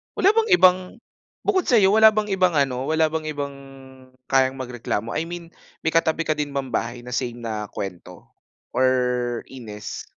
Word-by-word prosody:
Wala 380 - +4
bang 445 +1 +2
ibang 185 - +6 0.6
bukod 380 -3 +1
sa'yo 210 -6 +5
wala 220 +1 +6
bang 210 0 -1
ibang 185 -2 +2
ano? 135 -3 0
Wala 160 +1 +2
bang 160 0 -3
ibang 145 -2 -4 0.8
kayang 130 -1 +3
magreklamo? 120 -4 -4
I 155 - -2
mean 170 0 -8 0.3
may - - +1
katabi 165 0 +1
ka 155 -2 -1
din 145 -1 -3
ba 140 - 0
bahay 120 -2 -3
na 125 - -10
same 120 -1 -3
na 110 -2 -4
kuwento 90 -3 -8 0.5
or 125 -2 +1
inis? 110 -5 -8
140 Hz, 165 wpm, -23 LUFS, 120-170 Hz, 0.8 s, ibang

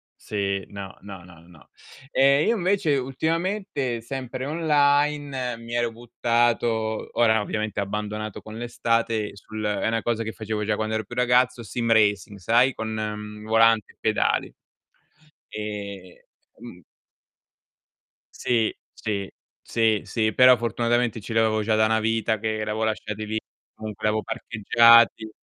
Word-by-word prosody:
Sì, 100 -2 -3
no, 100 -1 -8
no, 95 -3 -10
no, 85 -2 -16
no. 85 -3 -19 0.4
Ehm, 140 +2 +4
io 230 - +3
invece 185 -6 +1
ultimamente, 150 - -2
sempre 130 +1 -5
online, 145 -4 +1
mi 115 0 -9
ero 120 -1 0
buttato 115 -1 0
ora 110 -2 +4
ovviamente 105 0 -2
ho - - +1
abbandonato 105 +1 -5
con 110 +1 -10
l'estate 115 -3 -1
sul 110 +2 -8
è 105 +1 0
'na 115 -1 0
cosa 115 -1 -1
che 110 - -4
facevo 105 +1 -4
già 105 0 0
quando 110 0 -2
ero 110 - -1
più 120 +5 -10
ragazzo, 125 0 +2
sim 115 +2 -2
racing, 105 -2 +2
sai 120 +7 +3
con, 110 - -5
mhmm, 105 0 -5
volante 115 -1 +3
e - - -45
pedali. - - 0 1.0
Ehm, 100 -3 -7 0.4
mhmm 105 -7 -12 1.5
Sì, 115 -3 0 0.2
sì, 100 -3 -4 0.3
sì, 110 -2 +1
sì, 110 -2 0
però 125 -1 +7
fortunatamente 120 0 0
ce 110 +3 -7
li 115 - +3
avevo 110 -1 +2
già 110 0 +1
da 110 0 +4
'na 110 0 +2
vita 110 0 0
che 110 0 -2
l'avevo 105 +1 -2
lasciati 110 -1 -3
lì, 110 +1 -2 0.3
comunque 110 -1 -7
l'avevo 105 0 +1
parcheggiati. 115 +1 +4
110 Hz, 145 wpm, -24 LUFS, 105-120 Hz, 1.5 s, però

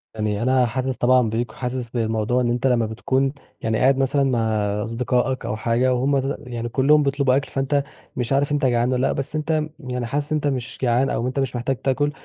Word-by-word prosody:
يعني 105 -1 -1
أنا 130 0 +3
حاسس 130 +1 -2
طبعًا 125 -2 +3
بيك، 115 +1 -2
وحاسس 125 0 -4
بالموضوع 115 +1 0
أنت 120 +1 +1
لمّا 120 -3 +2
بتكون 130 +5 0 0.3
يعني 110 -1 0
قاعد 135 +3 +3
مثلًا 135 +1 +2
مع 130 -3 +1 0.4
أصدقائك 125 +3 -1
أو 105 - -2
حاجة 120 +3 +1
وهُم 135 +2 +1
يعني 120 -1 -4
كلّهم 145 +5 +4
بيطلبوا 140 -2 +2
أكل، 140 - -1
فأنت 140 +1 0 0.3
مش 125 +1 -1
عارف 140 +1 +1
أنت 145 -1 +1
جعان 120 0 +2
والَّا 125 +1 +1
لأ، - - 0
بس 140 +3 -4
أنت 155 0 0 0.2
يعني 125 -1 -4
حاسس 145 +5 -2
إن 155 - +2
أنت 145 - -1
مش 130 -3 -3
جعان 125 +1 +2
أو 120 - -1
أنت 130 +2 -2
مش 130 -2 -1
محتاج 130 +3 -1
تاكل، 145 +3 0
130 Hz, 205 wpm, -22 LUFS, 120-135 Hz, 0.4 s, كلّهم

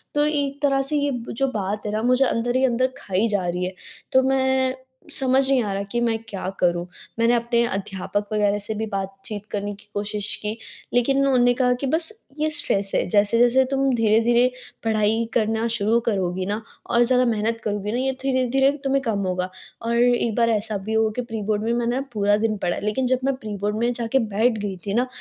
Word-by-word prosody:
तो 295 0 +4
एक 285 -2 -1
तरह 275 -2 +3
से 275 +3 -2
ये 285 0 +1 0.2
जो 270 +4 0
बात 205 0 -3
है 210 - -2
ना 215 +1 -1
मुझे 260 +2 +4
अंदर 240 0 0
ही 260 +1 +4
अंदर 255 +1 +1
खाई 200 -3 0
जा 200 -4 0
रही 180 +1 -1
है। 185 - -4 0.4
तो 260 - +5
मैं 265 -1 +2 0.4
समझ 260 0 +2
नहीं 270 -2 +4
आ 205 -2 -2
रहा 200 +1 -2
कि 240 - 0
मैं 230 -1 +1
क्या 195 -3 -5
करूँ? 175 -1 +1 0.3
मैंने 230 +1 +4
अपने 235 0 +2
अध्यापक 200 0 -3
वग़ैरह 205 -1 +2
से 205 +2 -4
भी 220 +1 -2
बातचीत 195 +1 -5
करने 205 0 -3
की 205 +1 -19
कोशिश 205 0 -2
की, 210 +1 -3 0.4
लेकिन 245 +3 +2
उन्होंने 255 -3 +4
कहा 250 0 +2
कि 275 - -1
बस 320 +7 0 0.3
ये 310 +1 +1
स्ट्रेस 200 -10 0
है, - - +2
जैसे-जैसे 235 +6 +4
तुम 270 -1 +2
धीरे-धीरे 230 +2 +3 0.3
पढ़ाई 220 0 +1
करना 225 0 +1
शुरू 230 0 +1
करोगी 185 -3 0
ना 205 +3 -2 0.3
और 235 0 +4
ज़्यादा 250 +1 +3
मेहनत 225 0 0
करोगी 205 -1 -2
ना 235 - -1
ये 265 +1 +1
धीरे-धीरे 270 0 +2
तुम्हें 275 0 +1
कम 225 -5 -1
होगा 180 0 -1 0.3
और 230 +1 -1
एक 240 -1 +3
बार 230 -1 +3
ऐसा 215 -1 0
भी 205 +3 -5
हुआ 220 0 +2
कि 250 - -1
प्री-बोर्ड 215 -3 -2
में 230 - 0
मैंने 240 +2 0
पूरा 205 -1 +3
दिन 215 0 0
पढ़ा 175 -3 -1
है, - - -6
लेकिन 230 +5 0
जब 255 0 +2
मैं 275 -1 +1
प्री-बोर्ड 210 -3 -3
में 240 +1 +2
जाके 235 +2 0
बैठ 220 +1 +1
गई 200 -2 -3
थी 200 - -1
ना 245 +3 +2
230 Hz, 210 wpm, -23 LUFS, 205-255 Hz, 0.4 s, तो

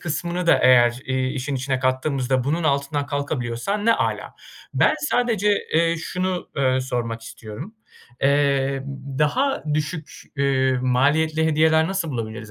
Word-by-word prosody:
kısmını 175 +2 -3
da - - +5
eğer, 125 -1 +5
eee, 130 -1 0
işin 135 +1 -3
içine 130 0 -1
kattığımızda 130 0 0
bunun 160 +5 0
altından 140 0 0
kalkabiliyorsan 145 - -2
ne 230 - +6
âlâ. - - -2 0.4
Ben - - +4
sadece, 240 -8 +1 0.3
eee, 165 +1 +3
şunu, 180 +2 -3
ııı, 130 -1 +2
sormak 120 -3 -3
istiyorum. 115 - -9 0.5
Eee, 140 -1 +2
ımm, 135 0 -7
daha 265 - +1
düşük, 155 +1 -3 0.2
eee, 135 -1 +2
maliyetli 155 +5 +2
hediyeler 160 +1 +3
nasıl 190 -5 -2
bulabiliriz 110 -3 -5
140 Hz, 135 wpm, -22 LUFS, 130-160 Hz, 0.5 s, ne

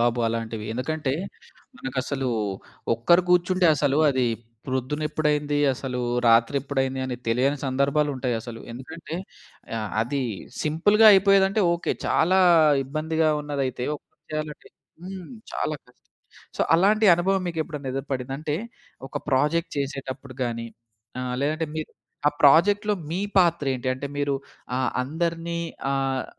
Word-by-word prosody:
బాబు 120 0 +2
అలాంటివి. 115 -1 -4
ఎందుకంటే, 135 +3 -2 0.6
మనకసలూ 130 0 -3 0.7
ఒక్కరు 170 +11 +4
కూర్చుంటే 180 0 +3
అసలూ 145 0 +1
అదీ 130 -2 +1 0.4
ప్రొద్దునెప్పుడైంది, 150 +2 -1 0.2
అసలూ 125 -1 -4 0.3
రాత్రెప్పుడైంది 135 +3 +2
అని 125 -2 -3
తెలియని 135 +5 +2
సందర్భాలుంటయసలు. 130 -4 -1
ఎందుకంటే, 155 +6 -8 0.6
ఆహ్, 105 -1 -4
అదీ 135 +3 -2 0.4
సింపుల్‌గా 205 +8 +4
అయిపోయేదంటే 195 +1 +4
ఓకే. 170 - -1
చాలా 185 +4 +3 0.5
ఇబ్బందిగా 160 +3 0
ఉన్నదైతే 135 -4 -2
ఒకళ్ళే - - -28
చెయ్యాలంటే 155 -1 -5 0.4
హ్మ్. 185 -2 -7 0.2
చాలా 155 - -1
కష్టం. 125 - -24 0.6
సో, - - -4 0.2
అలాంటి 210 +4 +4
అనుభవం 190 +2 +1
మీకెప్పుడన్నా 155 -5 -4
ఎదురుపడిందా? 135 -1 -3
అంటే, 155 -1 -2 0.5
ఒక - - -7
ప్రాజెక్ట్ 150 +6 +1
చేసేటప్పుడు 135 -1 -5
గానీ, 115 -1 -3 0.5
ఆహ్, 125 0 -3
లేదంటే 155 +2 -1
మీరు 155 - -5 0.4
ఆ - - +1
ప్రాజెక్ట్‌లో 205 +8 +5 0.2
మీ 180 +3 -1 0.2
పాత్రేంటి? 145 -8 +2
అంటే, 135 +2 -5
మీరు 145 -1 +1 0.4
ఆహ్, 130 - +1
అందరినీ 170 +3 -2 0.3
ఆహ్, 135 -1 0
145 Hz, 115 wpm, -25 LUFS, 130-165 Hz, 0.7 s, ప్రాజెక్ట్‌లో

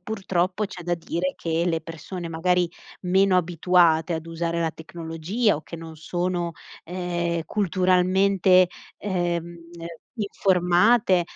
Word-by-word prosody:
purtroppo 190 -1 -1
c'è 190 -3 -8
da 175 - +1
dire 170 +2 -3
che 165 0 -1
le 165 -2 0
persone 165 +2 -7
magari 175 +1 +1 0.3
meno 190 +1 +3
abituate 175 -1 +3
ad 160 0 -5
usare 170 0 -2
la 165 - 0
tecnologia, 165 +6 -2
o 155 - -8
che 170 - -10
non 160 -1 -9
sono, 175 +1 -2 0.3
ehm, 175 -1 -2
culturalmente, 185 0 +3 0.3
ehm, 175 -3 -2 0.6
informate 190 0 +3
175 Hz, 115 wpm, -24 LUFS, 165-185 Hz, 0.6 s, meno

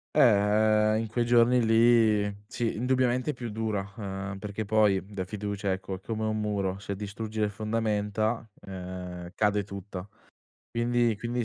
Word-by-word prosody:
Eh, 110 -3 +4
in 115 - -1
quei 120 +2 0
giorni 120 0 +4
lì 110 -3 +4
sì, 115 +1 -2
indubbiamente 125 +2 +1
è - - -1
più 125 -3 -6
dura, 105 -2 -3
uhm, 100 -2 -5
perché 105 +1 -5
poi 105 -2 +3
da 100 -2 -5
fiducia 100 0 -3
ecco, 95 0 -4
è 95 - -7
come 110 0 -3
un 110 0 -1
muro, 100 -3 -1
se 100 -1 -4
distruggi 105 +2 -5
le 105 - +2
fondamenta, 110 +1 -1
ehm, 90 -2 -7
cade 105 -1 +1
tutta. 100 -1 -7 0.6
Quindi 120 0 +1
quindi 120 +2 -2
105 Hz, 150 wpm, -28 LUFS, 100-115 Hz, 0.6 s, Eh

